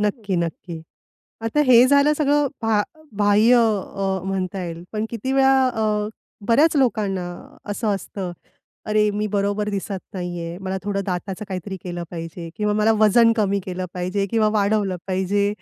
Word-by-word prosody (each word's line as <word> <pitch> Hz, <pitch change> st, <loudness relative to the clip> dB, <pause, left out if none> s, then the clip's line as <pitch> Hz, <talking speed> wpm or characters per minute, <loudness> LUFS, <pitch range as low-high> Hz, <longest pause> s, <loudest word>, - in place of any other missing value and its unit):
नक्की, 210 Hz, -2 st, -1 dB
नक्की. 170 Hz, -1 st, -4 dB, 0.6 s
आता 225 Hz, +6 st, 0 dB
हे 245 Hz, 0 st, +8 dB
झालं 285 Hz, +2 st, +4 dB
सगळं 290 Hz, -1 st, +2 dB
भा 220 Hz, -2 st, +2 dB, 0.4 s
बाह्य 210 Hz, +4 st, +5 dB
अ, 195 Hz, -4 st, 0 dB
म्हणता 190 Hz, 0 st, -2 dB
येईल, 170 Hz, -1 st, -6 dB
पण 215 Hz, 0 st, -2 dB
किती 235 Hz, +3 st, -4 dB
वेळा 265 Hz, -1 st, +4 dB
अ, 215 Hz, -3 st, 0 dB, 0.4 s
बऱ्याच 300 Hz, +8 st, +4 dB
लोकांना 210 Hz, -8 st, +1 dB, 0.5 s
असं 220 Hz, +2 st, -3 dB
असतं, 190 Hz, -1 st, -6 dB, 0.5 s
अरे 210 Hz, 0 st, +2 dB
मी 210 Hz, +1 st, -1 dB
बरोबर 205 Hz, +1 st, -1 dB
दिसत 200 Hz, -1 st, -3 dB
नाहीये. 175 Hz, -2 st, -5 dB
मला 190 Hz, 0 st, -3 dB
थोडं 200 Hz, -1 st, -1 dB
दाताचं 190 Hz, +2 st, -4 dB
काहीतरी 190 Hz, +1 st, -5 dB
केलं 175 Hz, -1 st, -5 dB
पाहिजे 165 Hz, 0 st, -7 dB
किंवा 210 Hz, 0 st, 0 dB
मला 215 Hz, +1 st, +3 dB
वजन 230 Hz, +2 st, +6 dB
कमी 200 Hz, -2 st, +1 dB
केलं 185 Hz, 0 st, -4 dB
पाहिजे 185 Hz, +2 st, -1 dB
किंवा 220 Hz, -2 st, +3 dB
वाढवलं 200 Hz, -2 st, +1 dB
पाहिजे. 190 Hz, +2 st, +1 dB
205 Hz, 150 wpm, -22 LUFS, 185-220 Hz, 0.6 s, हे